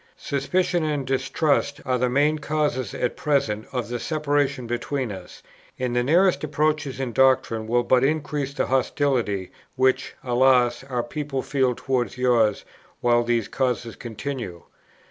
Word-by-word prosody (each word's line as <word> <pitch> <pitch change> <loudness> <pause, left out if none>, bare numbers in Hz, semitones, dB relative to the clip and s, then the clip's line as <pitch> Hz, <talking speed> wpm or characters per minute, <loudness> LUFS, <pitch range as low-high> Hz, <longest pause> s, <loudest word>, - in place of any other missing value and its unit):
Suspicion 175 +5 0
and 150 -3 -1
distrust 135 +2 0
are 125 -1 0
the 125 0 +1
main 145 +4 +2
causes 150 -6 -1
at 125 - -1
present 115 -8 0
of 125 -3 -2
the 120 0 -4
separation 145 -4 0
between 120 +1 -2
us, 95 -2 -10 0.3
and 125 -1 -2
the 120 - +3
nearest 175 +9 +3
approaches 150 -2 0
in 130 -3 -3
doctrine 120 -4 +2
will 120 +2 +2
but 125 +1 +3
increase 145 -1 -1
the 140 - -1
hostility, 125 -7 0 0.2
which, 130 0 +1
alas, 125 -1 +3
our 125 -3 -2
people 140 +1 -4
feel 130 -3 +1
towards 125 -4 -1
yours, 120 -4 +2 0.4
while 120 0 +4
these 120 -2 0
causes 125 -3 -2
continue. 115 -6 -6
130 Hz, 145 wpm, -24 LUFS, 120-145 Hz, 0.4 s, while